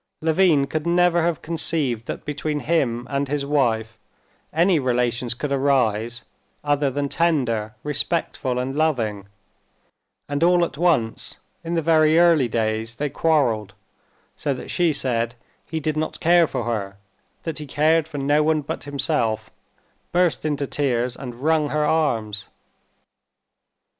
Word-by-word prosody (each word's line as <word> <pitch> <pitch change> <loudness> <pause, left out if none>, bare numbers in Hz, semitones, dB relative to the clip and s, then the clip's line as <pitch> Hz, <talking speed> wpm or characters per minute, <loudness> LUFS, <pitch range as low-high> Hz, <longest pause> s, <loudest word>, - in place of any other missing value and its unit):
Levin 160 -3 +3
could 155 +3 -3
never 175 0 +3
have 170 -1 -1
conceived 150 -8 0
that - - -6
between 150 0 -3
him 125 -7 0
and 140 0 -1
his 140 0 -2
wife 115 -6 0 0.5
any 170 +1 +3
relations 125 -2 0
could 140 +4 -4
arise 120 -4 +1 0.4
other 145 -1 +1
than 140 +2 -2
tender, 125 -10 0
respectful 145 -3 -1
and 130 +2 -2
loving, 115 -11 0 1.0
and 145 +2 -1
all 175 0 +4
at - - -8
once 150 -9 0 0.3
in 170 +1 -3
the 165 - 0
very 155 0 +4
early 170 -6 +5
days 110 0 -2
they 145 +2 -3
quarreled, 120 - +1 0.6
so 145 -3 -2
that - - -8
she 175 -3 +2
said 120 -4 0 0.3
he 160 - -3
did 155 0 -2
not 155 +1 -3
care 170 -1 +4
for 120 - -3
her, 100 -4 -3 0.5
that 160 -2 -4
he 150 - -7
cared 155 +3 +2
for 155 -2 -7
no 145 +2 +2
one 155 0 +2
but 145 - -6
himself, 135 -7 -1 0.6
burst 175 -5 +1
into 145 -2 -1
tears, 125 -3 -1
and 125 -1 -9
wrung 155 -1 +2
her 150 +1 0
arms. 110 -11 0
145 Hz, 145 wpm, -22 LUFS, 120-160 Hz, 1.0 s, early